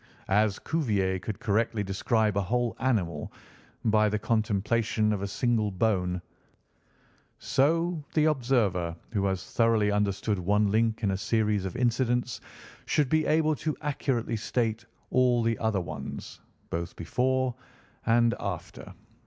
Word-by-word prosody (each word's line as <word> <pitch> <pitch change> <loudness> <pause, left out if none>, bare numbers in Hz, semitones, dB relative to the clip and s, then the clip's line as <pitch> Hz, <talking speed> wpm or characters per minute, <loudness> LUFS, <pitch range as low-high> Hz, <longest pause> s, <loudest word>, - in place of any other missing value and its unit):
As 105 0 +3
Cuvier 100 - 0
could 100 +3 -5
correctly 110 0 0
describe 105 +2 +1
a 100 - +2
whole 120 +5 0
animal 90 - -1 0.5
by 110 -1 +4
the 105 - 0
contemplation 110 0 +1
of 100 - -3
a 100 - -2
single 110 0 +1
bone, 90 -3 0 1.1
so 160 +4 +1
the 155 -1 +4
observer 115 - +1 0.2
who 100 -4 0
has 95 -1 -1
thoroughly 115 -3 +3
understood 100 0 0
one 100 +3 +2
link 110 +1 +1
in 100 - +2
a 95 - -1
series 105 -2 0
of 95 - -4
incidents 125 0 0 0.5
should 145 -4 +2
be 155 +2 +2
able 155 0 +3
to 155 -1 -2
accurately 135 -6 -1
state 115 0 -1 0.3
all 125 -2 +3
the 115 0 0
other 110 -3 +1
ones, 85 - -7 0.3
both 85 +1 -3
before 130 +8 0 0.5
and 115 0 +4
after. - - -6
110 Hz, 135 wpm, -28 LUFS, 100-125 Hz, 1.1 s, by